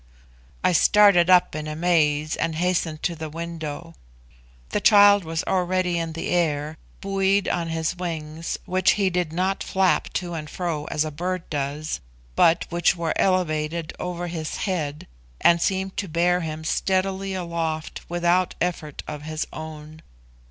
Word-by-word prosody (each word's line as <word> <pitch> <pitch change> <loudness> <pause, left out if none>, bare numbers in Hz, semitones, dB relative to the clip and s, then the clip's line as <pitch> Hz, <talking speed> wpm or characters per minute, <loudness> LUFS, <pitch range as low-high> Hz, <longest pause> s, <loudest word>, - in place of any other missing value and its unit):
I 185 - +4
started 185 0 +5
up 180 -1 +5
in 155 0 -4
amaze 155 -2 +1
and 160 - -2
hastened 170 -2 -1
to 170 - 0
the 160 -1 -6
window. 165 0 -6 0.8
The - - -1
child 205 -1 +7
was 160 0 -3
already 180 -1 0
in 165 -1 -3
the 165 - -4
air, 155 -3 0 0.2
buoyed 195 0 +1
on 170 -1 -1
his 165 +1 -2
wings, 165 -2 -4
which 185 +1 +3
he 195 -2 +1
did 175 -3 -1
not 185 +4 -1
flap 190 -1 +1
to 175 -1 -3
and 155 -2 -5
fro 165 -5 -3
as 150 +1 -1
a 155 - -4
bird 180 +4 -3
does, 145 - -3 0.4
but 165 - +4
which 175 +1 +2
were 165 -2 -1
elevated 165 -3 0
over 175 -1 -4
his 165 -3 -4
head, 155 -7 -3 0.3
and 170 0 +4
seemed 190 +1 -1
to 200 - -2
bear 175 +2 +2
him 160 -2 -5
steadily 190 +3 0
aloft 165 -3 -3
without 175 +1 +1
effort 165 -4 -3
of 150 -1 -6
his 155 +1 -3
own. 155 0 -9
170 Hz, 150 wpm, -24 LUFS, 155-180 Hz, 0.8 s, child